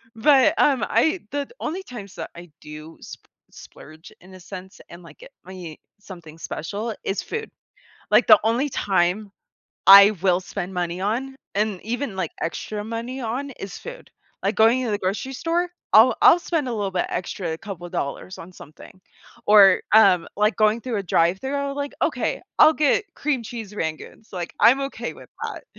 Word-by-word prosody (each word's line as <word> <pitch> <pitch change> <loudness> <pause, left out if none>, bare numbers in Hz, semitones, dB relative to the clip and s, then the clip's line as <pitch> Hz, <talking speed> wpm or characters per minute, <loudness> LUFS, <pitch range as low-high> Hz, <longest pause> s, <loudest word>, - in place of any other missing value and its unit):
But, 285 +6 +4
um, 270 -5 +3
I 315 +10 +2
the 285 -1 -3
only 355 +5 -4
times 210 - -10
that - - -7
I 170 -1 -12
do 155 +1 -11
sp - - -11 0.3
splurge, 155 +2 -14
in 185 +1 -16
a - - -13
sense, 190 +1 -10
and, 170 +1 -12
like, - - -16
get - - -14
me 180 -4 -9 0.2
something 170 -6 -12
special, 205 +9 -5
is 195 - -1
food. 445 -1 -5 0.6
Like, - - +5
the - - +8
only 240 +6 +1
time 195 -1 0 0.6
I 200 +1 +10
will 185 -2 +3
spend 185 0 -6
money 175 0 -3
on 245 +7 -2 0.2
and 205 -2 -1
even, 240 0 -4
like, 180 -4 -3
extra 210 +5 -4
money 230 +4 -5
on, 250 +5 -4
is 195 -6 -8
food, - - -11 0.3
like, - - 0
going 235 +4 +4
to 225 - -2
the 205 - -1
grocery 205 +8 -3
store, 345 +5 -1 0.2
I'll 225 +4 +7
I'll 350 - +7
spend 330 -5 -2
a 240 - -3
little 205 -3 -2
bit 180 -1 -1
extra, 175 -2 -4
a 160 - -4
couple 185 -4 -8
dollars 140 +6 -5
on 170 - -10
something, 165 +3 -15 0.5
or, 200 -3 +7
um, 195 -6 +5
like, 210 +2 +1
going 215 +1 +2
through 235 -2 -4
a - - -3
drive-through 185 +12 +1
I'll 280 0 -2
be - - -13
like, 285 0 -4
"Okay, - - -1 0.2
I'll 310 - +8
get 305 +7 +2
cream 280 -4 -1
cheese 220 -3 -8
rangoons," 160 +5 -6
like, 175 -2 -5
"I'm 260 +4 +6
okay - - -6
with - - -15 0.2
that," - - -6
210 Hz, 180 wpm, -23 LUFS, 180-260 Hz, 0.6 s, I